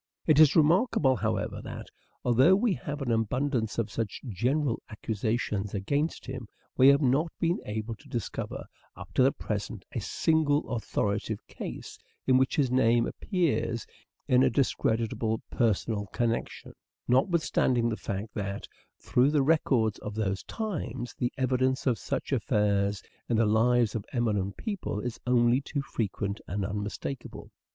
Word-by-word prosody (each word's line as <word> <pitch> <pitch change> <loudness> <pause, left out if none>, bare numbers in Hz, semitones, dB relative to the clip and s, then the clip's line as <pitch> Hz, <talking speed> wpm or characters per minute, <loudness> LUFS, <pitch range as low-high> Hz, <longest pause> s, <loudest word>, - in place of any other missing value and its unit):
It 155 -2 +5
is 155 -3 +7
remarkable, 160 - +4
however, - - -2
that, - - -7 0.4
although 130 +10 +5
we 215 +1 +2
have 150 -6 -5
an 125 - -1
abundance 115 +1 0
of 115 -3 -1
such 110 -4 -3
general 125 - 0
accusations 110 -2 -2
against 140 +11 -1
him, 130 -3 -6 0.3
we 130 - +6
have 140 +2 +6
not 140 +6 +2
been 170 +1 +1
able 110 +2 -3
to 145 - -18
discover, 120 -4 -4 0.3
up - - -11
to - - +3
the 135 +2 +5
present, 105 -3 -5
a - - -3
single 150 +6 +1
authoritative 110 -2 -2
case - - -8 0.3
in 130 -1 +5
which 130 - +1
his 135 -4 +2
name 120 -2 +4
appears 165 - -1 0.4
in 125 0 +5
a - - +5
discreditable 115 -4 0
personal 110 -2 0
connection; 115 +2 -2 0.3
notwithstanding 130 -4 +2
the 110 - -1
fact 100 +1 -4
that, 100 -1 -4 0.3
through 125 +3 +3
the 145 -2 +2
records 130 -8 +2
of 105 0 -6
those 100 -3 -1
times, 190 - -4
the 120 - 0
evidence 130 0 +1
of 125 -4 +1
such - - -3
affairs 105 -5 +1 0.3
in 115 - +2
the 115 - +4
lives 115 +1 +3
of 110 - -3
eminent 105 -6 0
people 200 - -3
is 120 +1 -4
only 120 +1 +4
too 140 0 -3
frequent 100 -4 -3
and 100 +1 -2
unmistakable. 105 +6 -5
120 Hz, 145 wpm, -28 LUFS, 110-140 Hz, 0.4 s, is